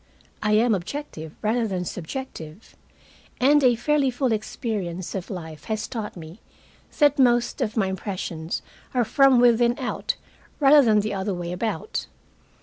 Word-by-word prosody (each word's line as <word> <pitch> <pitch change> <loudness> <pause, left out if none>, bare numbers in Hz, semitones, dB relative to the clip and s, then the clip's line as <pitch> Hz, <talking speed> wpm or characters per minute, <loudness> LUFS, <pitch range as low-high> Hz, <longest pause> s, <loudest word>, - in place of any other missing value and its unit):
I 210 0 +1
am 225 +2 +4
objective 175 - -5
rather 225 +2 +1
than 185 -3 -3
subjective, 180 - -7 0.6
and 285 +3 +5
a 245 -2 +5
fairly 285 +3 +2
full 255 0 0
experience 205 -5 -3
of 190 -3 -5
life 160 -5 -7
has 215 -1 -2
taught 220 -6 -5
me 165 +4 -10 0.6
that 290 -1 +4
most 240 +1 +3
of 230 -2 -1
my 205 - +3
impressions 180 -4 -4 0.3
are 245 -2 +3
from 270 +1 +5
within 240 0 +4
out 250 -2 -2 0.4
rather 290 0 +7
than 215 -3 +4
the 215 0 -3
other 195 0 -2
way 175 -1 -4
about. 220 - -3
220 Hz, 145 wpm, -24 LUFS, 185-250 Hz, 0.6 s, rather